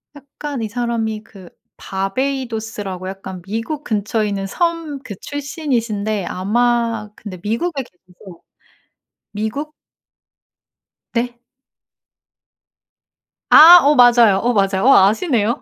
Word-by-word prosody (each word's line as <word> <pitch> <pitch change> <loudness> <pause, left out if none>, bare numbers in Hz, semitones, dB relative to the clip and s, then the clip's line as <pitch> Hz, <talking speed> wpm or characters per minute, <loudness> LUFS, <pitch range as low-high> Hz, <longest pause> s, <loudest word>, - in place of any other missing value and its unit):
약간 285 -1 -7
이 220 - -2
사람이 225 -2 -3
그 190 -5 -15 0.3
바베이도스라고 220 -3 -4
약간 190 -1 -8
미국 225 - -5
근처에 215 0 -1
있는 195 -1 -3
섬 330 - -2
그 220 -6 -8
출신이신데 235 - -3
아마 230 +2 0
근데 195 -4 -9
미국에 270 +7 -2
계셔서 180 -2 -17 0.9
미국 220 +9 -4 1.4
네? 240 0 -2 2.1
아. 335 +3 +10
어 290 +1 +3
맞아요, 240 -5 +6
어 245 +1 +1
맞아요. 195 -2 +1
어 275 - +7
아시네요. 235 - 0
225 Hz, 220 characters per minute, -18 LUFS, 205-270 Hz, 2.1 s, 아